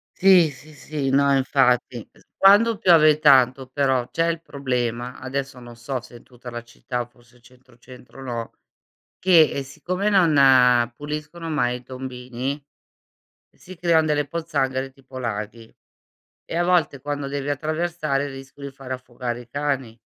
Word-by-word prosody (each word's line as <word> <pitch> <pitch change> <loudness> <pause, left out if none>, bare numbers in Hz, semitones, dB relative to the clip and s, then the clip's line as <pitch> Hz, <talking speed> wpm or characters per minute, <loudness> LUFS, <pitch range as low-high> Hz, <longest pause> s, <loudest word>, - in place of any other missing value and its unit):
Sì, 180 -5 +5
sì, 145 +4 -15
sì, 145 -2 -4
no 140 0 +3
infatti 125 -3 +1
es - - -24 0.2
quando 205 +3 +5
piove 155 -5 +5
tanto 130 -3 +4
però 130 -2 0
c'è 165 0 0
il 165 -1 -2
problema, 125 -4 -3
adesso 135 0 -5
non 120 -1 -12
so 120 +2 -5
se 120 - -14
è - - -17
tutta 125 -1 -12
la 120 - -6
città, 120 +1 -5
forse 120 0 -25
centro, 125 0 -22
centro 130 +1 -14
no, 120 -3 -5 0.7
che, 170 -5 +5
ehm, 140 - -3
siccome 180 +9 -3
non 130 - +5
puliscono 150 +4 -6
mai 125 -5 0
i - - -18
tombini 130 +2 -6 0.9
si 185 0 -14
creano 165 -2 +3
delle 145 -1 0
pozzanghere 135 -5 -2
tipo 130 -1 -13
laghi, 110 -1 -5 0.7
e 165 - -5
a 175 - +2
volte 175 -6 +1
quando 145 -1 -4
devi 140 0 -3
attraversare 155 -1 -2
rischio 135 +1 -11
di 140 - -6
far 135 -1 -8
affogare 125 -1 -5
i 120 - -20
cani. 135 -4 -3
135 Hz, 150 wpm, -23 LUFS, 125-155 Hz, 0.9 s, Sì